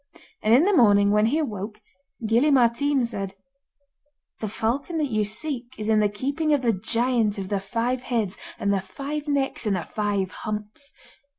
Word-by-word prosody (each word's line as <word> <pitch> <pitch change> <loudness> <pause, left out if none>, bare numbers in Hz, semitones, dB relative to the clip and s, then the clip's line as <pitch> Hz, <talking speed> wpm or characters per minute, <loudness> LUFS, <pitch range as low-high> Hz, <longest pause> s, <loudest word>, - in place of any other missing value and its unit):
And 215 - +1
in 270 - +6
the 405 +3 +3
morning, 205 -6 +5
when 210 +1 +4
he 280 +7 +1
awoke, 210 -8 -3 0.5
Gille 235 +7 +3
Mairtean 265 +1 +3
said: 195 -4 -5 1.0
'The 215 - -3
falcon 250 - -2
that 295 -4 -1
you 215 -1 +2
seek 245 +3 -5
is 215 0 -3
in 215 -1 +4
the 210 -1 +3
keeping 280 +9 -1
of 280 -3 +1
the 230 -2 +3
Giant 230 +1 +1
of 190 -1 -5
the 200 - 0
Five 235 +5 -2
Heads, 225 -7 -1 0.2
and 200 0 0
the 195 - +1
Five 285 +10 -5
Necks, 275 -5 0
and 200 - +2
the 175 - -2
Five 205 -3 -1
Humps. 215 +7 -6
225 Hz, 180 wpm, -25 LUFS, 205-275 Hz, 1.0 s, in